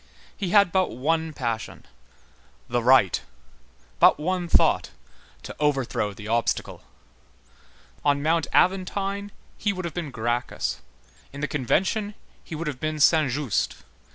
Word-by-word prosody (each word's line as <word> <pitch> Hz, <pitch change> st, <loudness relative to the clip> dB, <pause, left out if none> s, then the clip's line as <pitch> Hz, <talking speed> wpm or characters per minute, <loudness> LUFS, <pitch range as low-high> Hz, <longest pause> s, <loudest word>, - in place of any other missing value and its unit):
He 195 Hz, -4 st, -3 dB
had 200 Hz, -1 st, +5 dB
but 185 Hz, 0 st, +2 dB
one 160 Hz, +6 st, -1 dB
passion—the 120 Hz, -1 st, -6 dB
right; 125 Hz, -6 st, +4 dB, 0.8 s
but -, -, +6 dB
one 180 Hz, +2 st, -1 dB
thought—to -, -, -1 dB
overthrow 135 Hz, -8 st, 0 dB
the 105 Hz, +1 st, -10 dB
obstacle. 115 Hz, +1 st, -1 dB, 1.2 s
On 140 Hz, -1 st, +2 dB
Mount 165 Hz, +1 st, +1 dB
Aventine, 195 Hz, +2 st, +1 dB, 0.3 s
he 205 Hz, -, +1 dB
would 185 Hz, -2 st, -5 dB
have 170 Hz, -, -4 dB
been 170 Hz, -3 st, -4 dB
Gracchus; 120 Hz, 0 st, -2 dB, 0.5 s
in 140 Hz, -, -8 dB
the 150 Hz, -, 0 dB
Convention, 190 Hz, -, 0 dB, 0.3 s
he 165 Hz, -, -7 dB
would 165 Hz, +2 st, -4 dB
have 145 Hz, -5 st, -4 dB
been 155 Hz, 0 st, -3 dB
Saint 155 Hz, -1 st, +4 dB
Just. 135 Hz, -3 st, -1 dB
155 Hz, 125 wpm, -25 LUFS, 130-185 Hz, 1.2 s, but